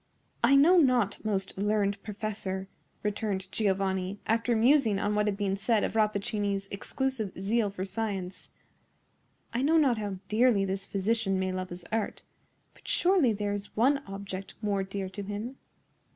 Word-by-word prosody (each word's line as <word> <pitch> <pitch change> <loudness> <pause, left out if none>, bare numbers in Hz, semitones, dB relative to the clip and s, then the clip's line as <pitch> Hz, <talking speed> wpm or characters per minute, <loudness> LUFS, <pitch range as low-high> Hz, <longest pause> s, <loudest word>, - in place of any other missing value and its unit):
"I 265 +4 +6
know 325 +7 +7
not, 250 - +2
most 195 -3 -2
learned 200 -1 +1
professor," 200 -3 -4 0.4
returned 200 -2 -2
Giovanni, 190 -2 0
after 230 +2 +1
musing 230 -2 +4
on 205 +1 0
what 210 0 +1
had 200 -1 0
been 200 -2 0
said 215 +2 +1
of - - -1
Rappaccini's 205 -2 0
exclusive 220 -1 -3
zeal 210 +2 +1
for 195 -1 -4
science,—"I 195 +3 -7
know 310 +4 +4
not 265 -8 +3
how 205 -2 -3
dearly 220 -2 +3
this 195 +1 -3
physician 200 0 0
may 185 0 0
love 185 0 -4
his 175 -1 -8
art; 225 -1 -2 0.5
but - - -19
surely 350 -9 +4
there 205 -1 -1
is 205 0 -7
one 270 +5 +4
object 195 -1 -6
more 205 -2 0
dear 195 0 -4
to 205 +2 -6
him. 210 +6 -5
205 Hz, 150 wpm, -29 LUFS, 195-225 Hz, 0.5 s, know